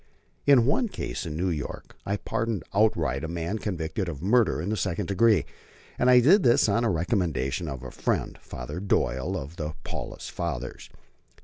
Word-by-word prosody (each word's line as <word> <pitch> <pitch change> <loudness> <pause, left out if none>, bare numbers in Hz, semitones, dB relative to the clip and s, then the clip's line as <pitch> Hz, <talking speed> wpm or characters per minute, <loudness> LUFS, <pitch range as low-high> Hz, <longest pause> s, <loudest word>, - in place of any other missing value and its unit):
In 135 -5 +7
one 185 - +2
case 95 - -5
in 75 -1 -4
New 90 +2 0
York 75 -4 -5
I 100 +1 0
pardoned 110 0 -2
outright 85 - +2
a - - -2
man 85 +6 -3
convicted 90 -1 -3
of 75 -5 -6
murder 110 -2 +3
in 85 +6 -3
the 110 - 0
second 95 -1 -1
degree, 100 - +3 0.5
and 125 - +4
I 125 -1 +8
did 185 - +6
this 120 -7 +4
on 110 +3 +2
the 120 - +2
recommendation 85 - 0
of 65 -4 -5
a 65 - -7
friend, - - -2
Father 75 +7 -6
Doyle 65 -9 0
of 75 +6 -7
the 75 -1 -4
Paulist - - -6
Fathers. 65 -7 -4
90 Hz, 180 wpm, -27 LUFS, 75-110 Hz, 0.5 s, I